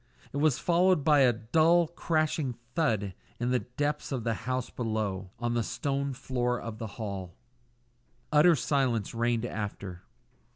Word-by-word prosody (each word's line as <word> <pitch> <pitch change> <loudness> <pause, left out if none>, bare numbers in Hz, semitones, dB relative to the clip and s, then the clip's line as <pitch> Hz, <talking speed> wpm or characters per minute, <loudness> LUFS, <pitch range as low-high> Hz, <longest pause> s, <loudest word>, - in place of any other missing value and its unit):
It - - -2
was 145 -2 +3
followed 175 -2 +3
by 150 -1 +5
a 130 -3 +6
dull, 160 +9 +3
crashing 155 -4 0 0.2
thud 110 - +1 0.3
in 120 +1 0
the 125 - +3
depths 145 +5 -3
of 130 -4 -2
the 115 0 0
house 130 +3 -3
below 105 -5 -2
on 120 0 -1
the 120 - +1
stone 140 +4 -2
floor 125 -1 -1
of 110 -1 -7
the 115 - -4
hall. 100 -6 -5 1.0
Utter 160 +3 +6
silence 125 -7 0
reigned 120 0 0
after. 100 -5 -5
125 Hz, 150 wpm, -29 LUFS, 110-150 Hz, 1.0 s, a